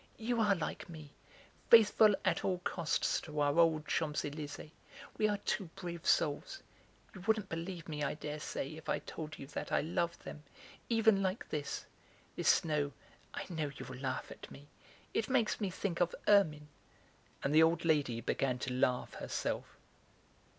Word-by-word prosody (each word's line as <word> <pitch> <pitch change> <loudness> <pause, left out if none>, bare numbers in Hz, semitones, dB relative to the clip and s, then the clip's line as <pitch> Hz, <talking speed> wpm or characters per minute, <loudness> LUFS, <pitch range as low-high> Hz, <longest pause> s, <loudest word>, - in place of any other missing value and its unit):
"You 230 0 0
are 205 -2 +4
like 170 0 -4
me, 155 -3 -10 0.6
faithful 215 -2 +7
at - - +1
all 185 -1 +1
costs 170 -3 0
to 150 -2 -5
our 145 +2 +2
old 160 -2 +4
Champs 155 -2 0
Elysées; 150 +1 -6 0.4
we 215 - +2
are 205 -1 0
two 195 - 0
brave 175 -3 -6
souls! 160 - +1 0.5
You 190 - -10
wouldn't 215 -3 +2
believe 170 +1 -5
me, 150 -2 -4
I 145 - 0
dare 150 0 -5
say, 150 0 -4
if 160 - -9
I - - +2
told 155 -2 -7
you - - -8
that 140 - -6
I - - +3
love 170 +2 -1
them, 150 - -8 0.5
even 220 -3 +4
like 195 +9 -1
this. 145 -2 -3 0.5
This - - +2
snow 150 -3 +2 0.4
(I - - -4
know, 160 -5 -2
you'll 130 - -7
laugh 130 -1 -3
at - - -10
me), 145 +1 -13 0.4
it 225 - 0
makes 240 -4 +1
me 200 - 0
think 185 -1 -3
of 175 - +2
ermine!" 155 -8 +4 0.7
And 140 - +1
the 155 - +7
old 165 +1 +3
lady 140 -8 +2
began 130 0 0
to 125 0 -3
laugh 125 0 +1
herself. - - -3
160 Hz, 170 wpm, -34 LUFS, 150-195 Hz, 0.7 s, faithful